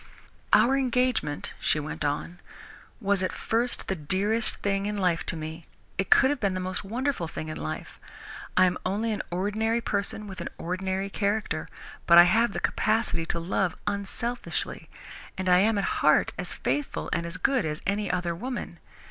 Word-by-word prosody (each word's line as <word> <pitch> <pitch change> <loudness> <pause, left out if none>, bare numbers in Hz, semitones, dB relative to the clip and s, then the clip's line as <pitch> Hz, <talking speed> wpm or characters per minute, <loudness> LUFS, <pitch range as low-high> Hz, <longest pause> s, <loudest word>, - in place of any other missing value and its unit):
"Our 270 +3 +5
engagement," 250 - 0
she 155 - +1
went 150 +1 -5
on, 150 +4 -2 0.6
"was 200 -3 +1
at 185 - 0
first 235 +2 -1
the - - 0
dearest 195 +7 +4
thing 195 0 0
in 210 0 -2
life 180 -4 +1
to - - +3
me. 160 +1 -6 0.4
It 195 - 0
could 265 - +6
have 290 - -2
been 195 -4 0
the - - -2
most 185 0 -3
wonderful 235 - -2
thing 155 0 -6
in 155 - -5
life. 75 - -6 0.6
I 185 - +7
am 180 0 0
only 210 +5 -1
an 210 - -1
ordinary 210 +6 0
person 205 -1 -2
with 190 -2 -8
an - - -4
ordinary 190 +2 -2
character, 205 +2 -1 0.4
but 170 - +8
I 175 - +12
have 220 +5 +3
the - - -2
capacity 215 -7 0
to 170 - -1
love 180 +1 0
unselfishly, 235 +5 -3 0.5
and 190 - -3
I 180 0 +6
am 215 +2 +3
at 200 - 0 0.2
heart - - +4
as - - -5
faithful 290 -2 -2
and 170 -1 -1
as 170 - -6
good 265 -6 +2
as 155 -1 -3
any 200 0 0
other 180 -1 -1
woman. 245 +8 -5
195 Hz, 180 wpm, -27 LUFS, 175-220 Hz, 0.6 s, I